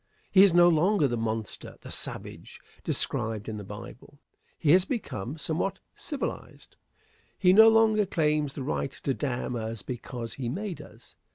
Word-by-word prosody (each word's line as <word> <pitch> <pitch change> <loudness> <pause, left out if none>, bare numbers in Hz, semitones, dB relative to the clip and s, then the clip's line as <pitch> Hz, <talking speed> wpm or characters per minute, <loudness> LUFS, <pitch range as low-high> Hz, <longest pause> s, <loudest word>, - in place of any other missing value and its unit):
He 190 - +7
is 200 -1 +7
no 175 +1 +6
longer 170 0 +3
the 120 - -2
monster, 110 -2 -4
the - - -10
savage, - - -5 0.2
described 110 -1 0
in 110 -1 -4
the 105 - -7
Bible. 105 +7 -11 0.4
He 150 -3 +2
has 180 +2 +6
become 155 - -4
somewhat 165 +5 -2 0.2
civilized. 290 -3 -6 0.6
He 180 -1 +4
no 220 +3 +9
longer 220 -2 +4
claims 150 -5 0
the 140 - -5
right 135 0 -2
to 135 - 0
damn 125 -3 -3
us 110 -1 -4
because 120 -2 -6
he 120 -1 -4
made 190 - -4
us. - - -16
150 Hz, 160 wpm, -27 LUFS, 115-185 Hz, 0.6 s, no